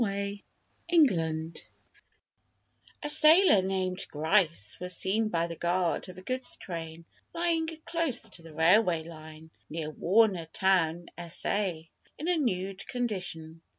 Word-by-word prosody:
A - - +5
STUDY 200 -1 -3 0.5
IN 335 -3 +7
THE 230 -9 +1
"NOOD" 160 0 -3 1.4
'A 295 - -2
sailor 310 - +6
named 185 -1 -2
Grice 160 - +1
was 180 -1 -2
seen 215 +4 +1
by 170 -3 0
the 170 0 -6
guard 175 +2 0
of 185 - -11
a 185 - -10
goods 255 +4 -3
train 165 -2 -7 0.3
lying 335 -1 +1 0.2
close 330 -9 -1
to 195 - -11
the 165 -2 -13
railway 170 0 +4
line 160 -1 -12 0.2
near 155 -1 -4
Warner 190 0 +2
Town 175 -3 +2
(S.A.) 175 0 -2 0.3
in 310 - -5
a 360 - +3
nude 195 -8 -2
condition. 180 -9 -4
185 Hz, 140 wpm, -29 LUFS, 165-220 Hz, 1.4 s, IN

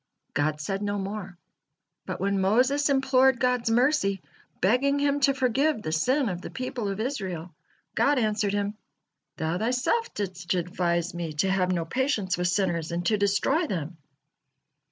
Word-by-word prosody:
God 150 +1 0
said 195 +6 -3
no 205 0 -1
more, 195 -2 -5 0.7
but - - -4
when 200 0 0
Moses 255 +9 +3
implored 265 -2 +3
God's 250 -2 +1
mercy, 235 -5 +2 0.4
begging 255 +9 +2
Him 285 0 +1
to 275 0 +4
forgive 270 +2 +1
the 155 - -3
sin 255 - +2
of 180 -3 -3
the - - -7
people 255 -4 -4
of 195 +1 -4
Israel, 190 - -4 0.4
God 285 0 +3
answered 210 -3 +1
him: 205 0 -1 0.6
"Thou 160 +3 -1
thyself 250 - 0
didst 185 -3 -3
advice 175 0 -1
Me 170 -2 -4
to 185 +6 +1
have 185 -1 +1
no 170 -2 -1
patience 220 - 0
with 180 0 0
sinners 175 -4 0
and 175 +1 -2
to 215 - +3
destroy 205 - +2
them." 165 - -4
205 Hz, 155 wpm, -26 LUFS, 180-255 Hz, 0.7 s, to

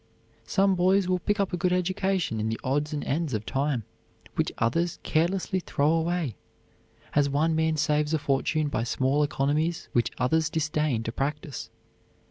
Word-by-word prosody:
Some 195 +6 +3
boys 185 +1 +3
will 185 0 +1
pick 205 +4 -1
up 195 -2 0
a - - 0
good 180 0 +1
education 180 - 0
in 110 +1 -1
the 110 - -3
odds 145 +3 0
and 150 -1 -3
ends 150 -3 -1
of 105 0 -3
time 135 -2 0 0.5
which - - 0
others 165 +10 0
carelessly 185 +4 +1
throw 150 -4 +1
away, 165 - 0 0.8
as 145 -1 +3
one 155 +3 +2
man 160 0 +1
saves 150 0 +1
a 160 - +3
fortune 145 +2 0
by 140 - -1
small 130 +4 +1
economies 150 +3 0
which 120 - +2
others 155 +5 +2
disdain 150 -6 0
to 115 - -3
practise. 145 +1 -4
155 Hz, 165 wpm, -27 LUFS, 140-175 Hz, 0.8 s, Some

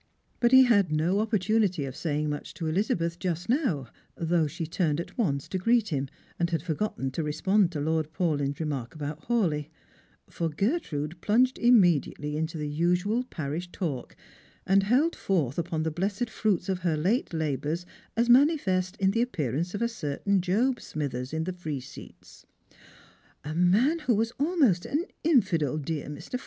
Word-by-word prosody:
But 240 0 +3
he 260 0 +9
had 200 -9 +3
no 165 +6 +1
opportunity 210 -6 +1
of 130 -1 -6
saying 150 -2 -1
much 145 0 -5
to 165 - -5
Elizabeth 170 0 0
just 175 -2 -2
now, 230 - +1 0.3
though 165 -1 +1
she 165 +3 -5
had 160 - -7
turned 160 -5 +1
at 170 - -6
once 140 - -1
to 190 - -2
greet 230 +3 +2
him, 140 -4 -1 0.3
and 170 0 +1
had 165 -3 -1
forgotten 160 -5 -2
to 165 - -3
respond 185 +5 +2
to 150 - -3
Lord 155 +1 -1
Paulyn's 145 -5 -1
re 160 - -1
mark 135 -3 -4
about 150 0 -6
Hawleigh; 170 -11 +1 0.6
for 165 -1 -2
Gertrude 170 - -2
plunged 250 +5 +2
immediately 175 - +3
into 160 +1 -2
the 150 -1 -3
usual 180 +9 +1
parish 165 - -5
talk, 145 -9 -4 0.5
and 195 +1 +4
held 255 +12 +2
foi'th 160 -8 0
upon 165 -2 -2
the 160 - -1
blessed 200 +7 -2
fruits 200 -5 0
of 190 -2 -1
her 170 -3 0
late 190 - 0
labours 155 +1 -2 0.3
as 235 +1 +3
manifest 240 - +3
in 195 -2 +2
the 230 +3 +1
appearance 170 - -2
of 205 - -1
a - - +3
certain 195 -1 -1
Job 230 +8 +1
Smithers 130 -4 -4
in 160 +1 -1
the 185 +2 -3
free 160 -6 -4
seats: 130 +2 -13 0.5
" - - -28
A 150 - -4
man 205 - +3
who 255 -7 +1
was 225 +2 0
almost 280 - +2
an 310 +5 -1 0.2
infidel, 190 - +2
dear 150 -1 -4
j\lr. 200 +11 -5
175 Hz, 175 wpm, -27 LUFS, 150-215 Hz, 0.6 s, he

